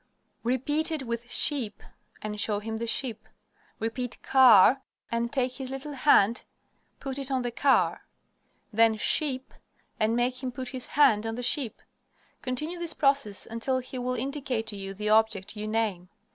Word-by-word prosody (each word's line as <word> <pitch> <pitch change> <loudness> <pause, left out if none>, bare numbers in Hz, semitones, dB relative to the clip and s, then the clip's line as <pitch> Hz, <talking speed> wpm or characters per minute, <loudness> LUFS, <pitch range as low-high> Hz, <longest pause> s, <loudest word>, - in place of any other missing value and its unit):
Repeat 290 +7 0
it 310 -4 -2
with 235 0 -4
"sheep" 250 -9 0 0.4
and 210 0 -4
show 210 -2 0
him 220 +2 -4
the 230 +1 -4
sheep. 230 -2 -2 0.5
Repeat 230 +2 -4
"car," 255 -1 +6 0.3
and 235 0 -1
take 255 -2 0
his 265 -2 -5
little 270 +3 -6
hand, 250 -5 +3 0.6
put 270 0 -4
it 275 -1 -2
on 260 -2 0
the 240 - -2
car. 270 +3 +2 0.7
Then 225 0 +4
"sheep," 265 +3 0 0.5
and 220 +1 +2
make 250 +1 0
him 260 -2 -3
put 255 -1 -6
his 255 -2 -5
hand 230 -7 +3
on 225 - -3
the 245 - -5
sheep. 250 -2 0 0.6
Continue 305 +8 -2
this 340 -1 +1
process 275 -8 +1
until 230 +3 -1
he 255 0 -6
will 250 +1 -2
indicate 265 -2 -2
to 220 - -6
you 195 0 -6
the 210 +2 -2
object 215 -2 +2
you 210 0 -5
name. 215 -5 -1
245 Hz, 165 wpm, -27 LUFS, 220-270 Hz, 0.7 s, car